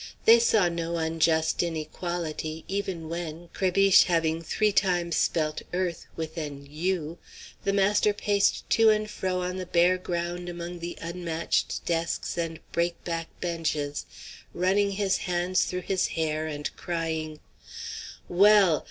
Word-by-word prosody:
They 230 +1 +8
saw 220 -5 +4
no 170 0 -2
unjust 160 0 +1
inequality 160 -1 -4
even 190 -4 -3
when, 170 0 -5
Crébiche 195 +1 +5
having 165 -2 +1
three 210 +5 +1
times 175 -4 +1
spelt 155 -2 0
"earth" 180 -3 -2
with 160 +1 -5
an 145 -2 -6
u, 165 +2 -2 0.5
the 200 - +2
master 200 +1 +3
paced 205 -1 +1
to 225 -1 +6
and 215 0 +2
fro 185 -3 -2
on 180 +1 -3
the 185 -1 -5
bare 180 +1 +3
ground 175 0 -3
among 175 0 -6
the 170 +1 -6
unmatched 170 -1 -2
desks 165 -1 -1
and 165 -2 -3
break 170 0 -1
back 165 -1 -3
benches, 155 -4 -2 0.5
running 200 +3 +2
his 195 -1 +1
hands 180 +1 +1
through 180 0 -3
his 190 +1 0
hair 155 -1 -1
and 150 -1 -4
crying: 160 -2 -3 0.9
"Well! 195 -2 +5
170 Hz, 135 wpm, -27 LUFS, 160-185 Hz, 0.9 s, They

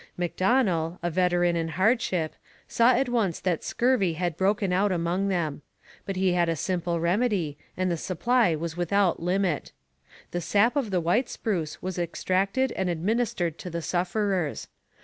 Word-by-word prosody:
Macdonell, 180 -2 +1
a 175 - 0
veteran 175 0 +2
in 165 -1 -1
hardship, 185 - +1 0.3
saw 235 +1 +4
at 260 +2 +1
once 225 -8 0
that 180 -4 -1
scurvy 235 -8 +1
had 175 0 -2
broken 195 +1 +1
out 200 +2 +2
among 175 +2 0
them; 165 -7 -1 0.5
but 195 - -2
he 185 -1 +2
had 175 -1 +2
a 165 - +1
simple 175 +1 -1
remedy 180 -3 0 0.2
and 185 -1 0
the 170 - 0
supply 190 +2 +1
was 165 +1 -4
without 175 +1 +1
limit. 180 -2 -1 0.6
The 175 - -2
sap 210 - +2
of 270 -7 0
the 185 -3 0
white 210 +10 +1
spruce 175 -9 -3
was 185 -1 -3
extracted 195 +8 0
and 190 -1 -2
administered 175 -1 -1
to 180 - -6
the 170 -1 -4
sufferers. 180 -2 -1
180 Hz, 160 wpm, -26 LUFS, 170-205 Hz, 0.6 s, saw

